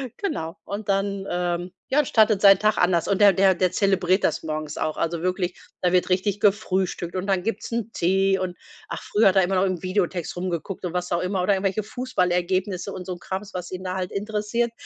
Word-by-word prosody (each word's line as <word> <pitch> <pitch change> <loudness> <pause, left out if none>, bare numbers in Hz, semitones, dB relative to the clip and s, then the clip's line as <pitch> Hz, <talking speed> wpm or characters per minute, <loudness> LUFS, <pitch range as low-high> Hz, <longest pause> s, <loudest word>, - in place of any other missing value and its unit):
Genau. 165 - -3
Und 205 +1 -6
dann, 195 0 -1
ähm, 175 0 -2 0.2
ja, 290 +1 +3
startet 215 -4 +4
sein 195 -1 +8
Tag 215 +1 +1
anders 175 0 +2
und 200 - +1
der 200 -2 +7
der 190 +1 +4
der 185 0 0
zelebriert 190 -2 +2
das - - 0
morgens 155 -1 -4
auch. 155 -1 -1
Also 165 0 -2
wirklich, 180 0 -2 0.2
da 180 -1 +2
wird 180 -1 +3
richtig 190 +2 +1
gefrühstückt 190 -3 0
und 190 +2 -3
dann 190 -2 +1
gibt's 225 - -3
'n 230 -1 -2
Tee 190 +2 +2
und 180 -1 -4 0.3
ach, - - -6
früher 210 0 +3
hat 190 - +3
er 190 - +5
immer 190 +2 0
noch 185 +1 +3
im 185 -2 -2
Videotext 185 -2 -1
rumgeguckt 180 +1 -4
und 175 - -4
was 180 0 -3
auch 170 - +1
immer 185 0 -1
oder 200 - +3
irgendwelche 195 +2 -1
Fußballergebnisse 185 -5 -1
und 185 - -6
so 185 - -5
'n 175 - -10
Krams, 190 +2 -6
was 180 0 -5
ihn 185 0 -6
da 185 0 -3
halt 185 -1 -3
interessiert. 215 +3 -1
190 Hz, 220 wpm, -24 LUFS, 180-200 Hz, 0.3 s, sein